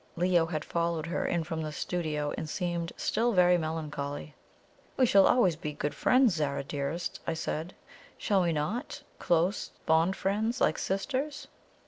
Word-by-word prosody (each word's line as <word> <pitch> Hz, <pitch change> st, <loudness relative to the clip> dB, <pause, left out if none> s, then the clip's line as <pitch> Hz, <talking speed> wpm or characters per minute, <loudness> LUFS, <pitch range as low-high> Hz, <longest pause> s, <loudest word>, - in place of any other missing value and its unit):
Leo 175 Hz, -1 st, +3 dB
had 155 Hz, -3 st, -3 dB
followed 170 Hz, -2 st, -1 dB
her 170 Hz, +2 st, -2 dB
in 170 Hz, -1 st, 0 dB
from 160 Hz, 0 st, -4 dB
the 155 Hz, -1 st, -4 dB
studio, 150 Hz, -3 st, -2 dB
and 155 Hz, -, -5 dB
seemed 170 Hz, -1 st, -2 dB
still 235 Hz, +1 st, +1 dB
very 180 Hz, -1 st, +5 dB
melancholy. 150 Hz, -3 st, -4 dB, 0.6 s
"We 260 Hz, -, +5 dB
shall 195 Hz, -4 st, +6 dB
always 195 Hz, -10 st, +4 dB
be 150 Hz, -1 st, -5 dB
good 145 Hz, 0 st, -3 dB
friends, 255 Hz, -5 st, +4 dB
Zara 145 Hz, -4 st, -1 dB
dearest," 145 Hz, +4 st, -3 dB
I 165 Hz, -, 0 dB
said, 160 Hz, +2 st, -4 dB, 0.4 s
"shall 200 Hz, -2 st, +2 dB
we 170 Hz, -1 st, +2 dB
not? 210 Hz, -, -3 dB, 0.2 s
Close, 175 Hz, +4 st, +1 dB, 0.2 s
fond 165 Hz, +4 st, +3 dB
friends, 220 Hz, +5 st, -1 dB
like -, -, +2 dB
sisters?" 270 Hz, +9 st, -2 dB
170 Hz, 155 wpm, -29 LUFS, 155-195 Hz, 0.6 s, shall